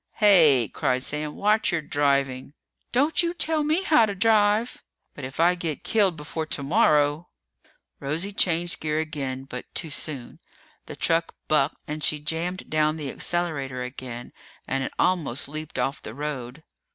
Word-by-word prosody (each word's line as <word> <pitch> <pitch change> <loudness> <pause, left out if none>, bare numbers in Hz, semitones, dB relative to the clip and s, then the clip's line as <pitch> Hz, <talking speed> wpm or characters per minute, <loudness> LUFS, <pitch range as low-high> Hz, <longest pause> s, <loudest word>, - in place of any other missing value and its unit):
"Hey!" 160 - +5
cried 130 +4 -1
Sam. 150 +1 -3
"Watch 210 +1 +2
your 170 -3 -1
driving!" 140 -2 0 0.4
"Don't 290 +6 +3
you 340 0 -1
tell 315 -2 +1
me 315 +5 +1
how 305 - +5
to 200 - -3
drive!" 215 +2 +2 0.3
"But 140 - -7
if 130 +3 -9
I 175 +2 +5
get 165 -4 -4
killed 200 -6 +2
before 155 +2 -4
tomorrow 150 0 +2 0.3
" - - -36
Rosie 160 +8 -2
changed 175 -3 0
gear 155 -1 -1
again, 140 -4 -3
but 125 -2 -7
too 160 - -2
soon. 140 -4 -5 0.5
The - - -7
truck 165 0 0
bucked, 150 -3 +2
and 150 0 -4
she 150 - +2
jammed 165 +5 -3
down 155 0 +1
the 145 -4 -4
accelerator 140 -8 -1
again, 125 -1 -7 0.3
and 135 0 -1
it - - -4
almost 145 -8 +2
leaped 155 +1 -6
off 135 - -1
the 110 - -8
road. 145 -1 -5
155 Hz, 160 wpm, -25 LUFS, 140-180 Hz, 0.5 s, Hey